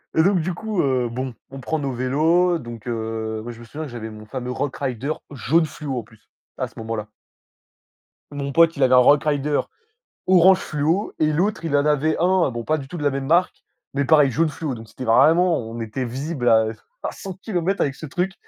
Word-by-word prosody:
Et 160 Hz, -, +5 dB
donc, 185 Hz, 0 st, +3 dB
du 175 Hz, +2 st, -2 dB
coup, 215 Hz, +1 st, -4 dB
heu, 130 Hz, -3 st, +1 dB
bon, 130 Hz, +1 st, -4 dB, 0.2 s
on 135 Hz, -, -9 dB
prend 160 Hz, +4 st, -2 dB
nos 140 Hz, -2 st, -2 dB
vélos, 160 Hz, +8 st, +2 dB
donc 120 Hz, -4 st, -9 dB
heu 110 Hz, -1 st, -3 dB
moi 120 Hz, +2 st, -7 dB
je 115 Hz, -, -12 dB
me 120 Hz, -, -11 dB
souviens 150 Hz, +7 st, -7 dB
que 140 Hz, -, -9 dB
j'avais 110 Hz, -2 st, -6 dB
mon 110 Hz, 0 st, -11 dB
fameux 125 Hz, +1 st, -5 dB
Rockrider 135 Hz, 0 st, -3 dB, 0.2 s
jaune 155 Hz, +5 st, +2 dB
fluo 145 Hz, -3 st, -5 dB
en 120 Hz, -, -3 dB
plus, 110 Hz, 0 st, -23 dB, 0.3 s
à -, -, -1 dB
ce -, -, -22 dB
moment-là. 110 Hz, -1 st, -4 dB, 1.2 s
Mon 140 Hz, -1 st, -4 dB
pote, 165 Hz, +2 st, +4 dB
il 140 Hz, -, +2 dB
avait 130 Hz, 0 st, +4 dB
un -, -, +8 dB
Rockrider 145 Hz, +2 st, +3 dB, 0.7 s
orange 185 Hz, 0 st, +6 dB
fluo 160 Hz, +7 st, -1 dB
et 155 Hz, 0 st, +3 dB
l'autre 175 Hz, +2 st, 0 dB
il 145 Hz, -, 0 dB
en 145 Hz, 0 st, +3 dB
avait 150 Hz, +1 st, +2 dB
un 180 Hz, -4 st, +3 dB
bon, 120 Hz, 0 st, -5 dB
pas 155 Hz, +6 st, +1 dB
du 135 Hz, -3 st, -7 dB
tout 175 Hz, -, -7 dB
de 150 Hz, -, -4 dB
la 145 Hz, -, +3 dB
même 135 Hz, 0 st, -3 dB
marque 175 Hz, +4 st, +2 dB, 0.3 s
mais 140 Hz, -, +1 dB
pareil 150 Hz, -2 st, +5 dB
jaune 160 Hz, +5 st, +1 dB
fluo 150 Hz, -2 st, -4 dB
donc 110 Hz, -1 st, -10 dB
c'était 120 Hz, +4 st, -9 dB
vraiment 160 Hz, +9 st, +5 dB
on 115 Hz, +1 st, -7 dB
était 115 Hz, +4 st, -3 dB
visibles 130 Hz, +2 st, -3 dB
à 110 Hz, -1 st, +5 dB, 0.3 s
à -, -, -3 dB
100 195 Hz, -, -7 dB
kilomètres 195 Hz, -1 st, -2 dB
avec 140 Hz, -1 st, 0 dB
ce -, -, -8 dB
truc. 180 Hz, +6 st, -2 dB
140 Hz, 220 wpm, -22 LUFS, 120-165 Hz, 1.2 s, un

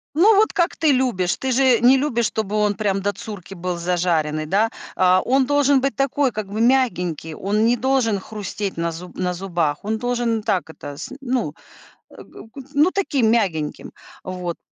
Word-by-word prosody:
Ну, 405 Hz, +6 st, +6 dB
вот 430 Hz, +2 st, +3 dB
как 345 Hz, 0 st, +1 dB
ты 310 Hz, -3 st, +2 dB
любишь. 240 Hz, -9 st, +1 dB
Ты 265 Hz, -1 st, -2 dB
же 255 Hz, -1 st, +4 dB
не 255 Hz, +2 st, +6 dB
любишь, 245 Hz, -4 st, 0 dB
чтобы 215 Hz, -1 st, -3 dB
он 210 Hz, -1 st, +2 dB
прям 195 Hz, -1 st, -1 dB
до 205 Hz, +1 st, -1 dB
цурки 195 Hz, -1 st, -9 dB
был 180 Hz, -1 st, -4 dB
зажаренный, 170 Hz, -3 st, 0 dB
да? 210 Hz, +6 st, +2 dB, 0.3 s
Э, 185 Hz, 0 st, +4 dB
он 265 Hz, +1 st, +2 dB
должен 285 Hz, -1 st, +3 dB
быть 275 Hz, 0 st, -1 dB
такой, 275 Hz, -1 st, +1 dB
как 215 Hz, -1 st, -5 dB
бы 215 Hz, +3 st, -3 dB
мягенький, 180 Hz, -, +1 dB
он 210 Hz, +3 st, 0 dB
не 240 Hz, -, +3 dB
должен 245 Hz, -5 st, +1 dB
хрустеть 205 Hz, -2 st, -5 dB
на 170 Hz, 0 st, -1 dB
зуб 175 Hz, +2 st, -10 dB
на 180 Hz, -1 st, -1 dB
зубах, 170 Hz, -5 st, -2 dB
он 220 Hz, +1 st, -1 dB
должен 240 Hz, -2 st, -1 dB
так 185 Hz, -5 st, -1 dB
это, 145 Hz, -2 st, -9 dB
с -, -, -7 dB
ну, 245 Hz, -, -1 dB, 0.6 s
э, -, -, -13 dB
г -, -, -14 dB
г 275 Hz, -, -8 dB
ну 300 Hz, +6 st, +4 dB
таким 280 Hz, -, +1 dB
мягеньким. 170 Hz, -10 st, -1 dB, 0.3 s
Вот. 180 Hz, -2 st, -5 dB
215 Hz, 190 wpm, -21 LUFS, 180-260 Hz, 0.6 s, Ну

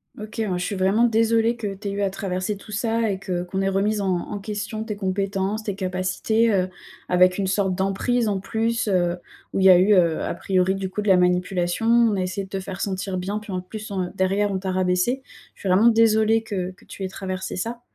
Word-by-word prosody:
OK, 215 Hz, -2 st, -9 dB
ouais. 220 Hz, -, 0 dB
Je 180 Hz, -, -2 dB
suis 205 Hz, -, -3 dB
vraiment 195 Hz, +4 st, +2 dB
désolée 230 Hz, 0 st, +3 dB
que 205 Hz, -4 st, -4 dB
tu 200 Hz, +1 st, -5 dB
aies -, -, -3 dB
eu 200 Hz, +1 st, -3 dB
à 200 Hz, -, +2 dB
traverser 190 Hz, +1 st, -3 dB
tout 215 Hz, -, -13 dB
ça 225 Hz, 0 st, 0 dB
et 190 Hz, -, -3 dB
que 180 Hz, -3 st, -3 dB
qu'on 190 Hz, +2 st, -3 dB
ait 195 Hz, -, +1 dB
remis 205 Hz, +2 st, 0 dB
en 195 Hz, -, -1 dB
en 185 Hz, +2 st, -2 dB
question 210 Hz, +1 st, -4 dB
tes 220 Hz, -2 st, -4 dB
compétences, 195 Hz, +1 st, -1 dB
tes 205 Hz, -3 st, -3 dB
capacités, 190 Hz, +4 st, 0 dB
heu, 185 Hz, -2 st, +1 dB, 0.4 s
avec 180 Hz, +1 st, +4 dB
une 200 Hz, -, 0 dB
sorte 190 Hz, 0 st, 0 dB
d'emprise 195 Hz, +5 st, 0 dB
en 200 Hz, -2 st, 0 dB
plus, 225 Hz, +3 st, -1 dB
heu, 175 Hz, -2 st, +1 dB, 0.4 s
où -, -, 0 dB
il 190 Hz, -, +3 dB
y -, -, +9 dB
a 180 Hz, -, +9 dB
eu, 195 Hz, +4 st, +5 dB
heu, 170 Hz, -4 st, +3 dB
a -, -, -2 dB
priori, 190 Hz, 0 st, +1 dB
du 195 Hz, -1 st, -3 dB
coup, 210 Hz, +3 st, -3 dB
de -, -, -5 dB
la 190 Hz, -2 st, +6 dB
manipulation. 180 Hz, +2 st, +1 dB
On 230 Hz, -2 st, +4 dB
a 190 Hz, -, -1 dB
essayé 190 Hz, +2 st, -3 dB
de 190 Hz, -, -18 dB
te 195 Hz, -, -3 dB
faire 190 Hz, 0 st, -7 dB
sentir 190 Hz, -1 st, -2 dB
bien, 195 Hz, +3 st, -3 dB
puis, 215 Hz, -1 st, -8 dB
en 185 Hz, -1 st, -2 dB
plus, 215 Hz, +3 st, -8 dB
on 185 Hz, -2 st, -2 dB
derrière, 195 Hz, +2 st, +1 dB
on 195 Hz, -, -1 dB
t'a 190 Hz, 0 st, -3 dB
rabaissée. 185 Hz, +7 st, +1 dB, 0.3 s
Je -, -, -27 dB
suis 195 Hz, -, -3 dB
vraiment 195 Hz, +6 st, +5 dB
désolée 225 Hz, -1 st, +4 dB
que 190 Hz, -4 st, -4 dB
que 185 Hz, -, -20 dB
tu 195 Hz, -, -8 dB
aies -, -, -1 dB
traversée 190 Hz, 0 st, -5 dB
ça. 230 Hz, +6 st, -4 dB
195 Hz, 245 wpm, -23 LUFS, 185-215 Hz, 0.4 s, y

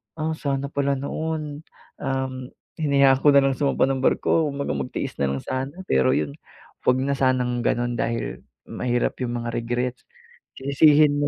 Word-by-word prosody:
"Ah, 160 Hz, 0 st, -2 dB
sana 140 Hz, -2 st, -2 dB
pala 140 Hz, 0 st, +1 dB
noon 150 Hz, +1 st, -4 dB, 0.4 s
um, 135 Hz, -2 st, -2 dB, 0.5 s
hinayaan 140 Hz, -3 st, +4 dB
ko 150 Hz, -, +7 dB
na 140 Hz, -, +8 dB
lang 135 Hz, -1 st, +2 dB
sumampa 140 Hz, -2 st, +2 dB
ng 135 Hz, -1 st, -1 dB
barko" 160 Hz, +3 st, +2 dB
Kumbaga 140 Hz, -, -3 dB
magtiis 65 Hz, -2 st, -4 dB
na 70 Hz, -, +2 dB
lang 70 Hz, -, -3 dB
sana. 130 Hz, +2 st, -3 dB
Pero 65 Hz, -1 st, +3 dB
iyon 75 Hz, -1 st, -1 dB, 0.5 s
huwag 125 Hz, +1 st, +4 dB
na 140 Hz, +1 st, 0 dB
sanang 125 Hz, -2 st, +1 dB
ganun 120 Hz, -1 st, 0 dB
dahil 115 Hz, 0 st, -2 dB, 0.3 s
mahirap 120 Hz, -1 st, -1 dB
iyong 120 Hz, -1 st, -2 dB
mga -, -, -2 dB
regrets. 120 Hz, +2 st, -2 dB, 0.5 s
Sisisihin 145 Hz, +2 st, +4 dB
mo 145 Hz, -, +1 dB
135 Hz, 160 wpm, -24 LUFS, 120-140 Hz, 0.5 s, na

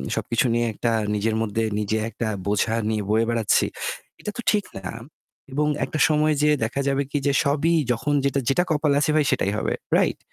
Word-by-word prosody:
সবকিছু 115 Hz, +2 st, 0 dB
নিয়ে 120 Hz, 0 st, +1 dB
একটা 115 Hz, +2 st, -1 dB, 0.2 s
নিজের 110 Hz, +2 st, 0 dB
মধ্যে 115 Hz, 0 st, -1 dB, 0.2 s
নিজে 105 Hz, +1 st, -1 dB
একটা 115 Hz, -, -4 dB, 0.2 s
বোঝা 105 Hz, +2 st, +1 dB, 0.2 s
নিয়ে 105 Hz, -2 st, -1 dB
বয়ে 110 Hz, +2 st, +3 dB
বেড়াচ্ছি, 115 Hz, -3 st, +2 dB, 0.6 s
এটা 210 Hz, -, -4 dB
তো -, -, -3 dB
ঠিক 210 Hz, -1 st, +1 dB
না 95 Hz, -1 st, -6 dB, 0.7 s
এবং 150 Hz, +1 st, +1 dB, 0.2 s
একটা 155 Hz, -, -4 dB
সময় 155 Hz, 0 st, +3 dB
যেয়ে 150 Hz, 0 st, +4 dB
দেখা 140 Hz, +5 st, -2 dB
যাবে 140 Hz, +1 st, +1 dB
কি? 145 Hz, -, 0 dB
যে -, -, +4 dB
সবই 150 Hz, +4 st, +2 dB, 0.2 s
যখন 145 Hz, +6 st, -2 dB
যেটা 140 Hz, 0 st, +1 dB
যেটা 175 Hz, +6 st, +3 dB
কপালে 150 Hz, -2 st, +2 dB
আছে 155 Hz, -, +2 dB
ভাই 150 Hz, -, +3 dB
সেটাই 100 Hz, -, +1 dB
হবে, -, -, -1 dB, 0.2 s
রাইট? -, -, +1 dB
135 Hz, 190 wpm, -23 LUFS, 110-150 Hz, 0.7 s, যেয়ে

